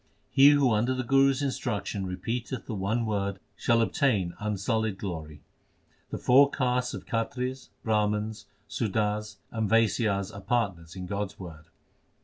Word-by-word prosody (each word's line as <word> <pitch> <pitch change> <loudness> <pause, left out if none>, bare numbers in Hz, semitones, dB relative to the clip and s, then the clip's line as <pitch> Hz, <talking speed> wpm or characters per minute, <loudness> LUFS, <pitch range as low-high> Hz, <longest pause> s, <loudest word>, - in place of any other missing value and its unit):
He 140 +1 +8
who 145 -4 +4
under 120 +4 +2
the 130 - -2
Guru 135 +2 +4
s 135 +1 -1
instruction 105 -7 -2
repeateth 115 +8 -4
the 115 - -5
one 110 +4 -1
Word 100 -2 -1 0.2
shall 115 +3 +2
obtain 105 -8 +1
unsullied 105 0 -1
glory. 80 -7 -6 0.7
The - - -4
four 140 +3 +6
castes 125 -3 0
of - - -8
Khatris, 125 +3 -3 0.2
Brahmans, 105 -1 0 0.2
Sudars, 105 -1 -1 0.2
and 110 -3 -1
Vaisyas 110 -3 +2
are 100 - -8
partners 95 -8 -1
in 90 -1 -6
God 100 +1 -3
s - - -30
word. 80 -4 -9
110 Hz, 145 wpm, -28 LUFS, 100-125 Hz, 0.7 s, He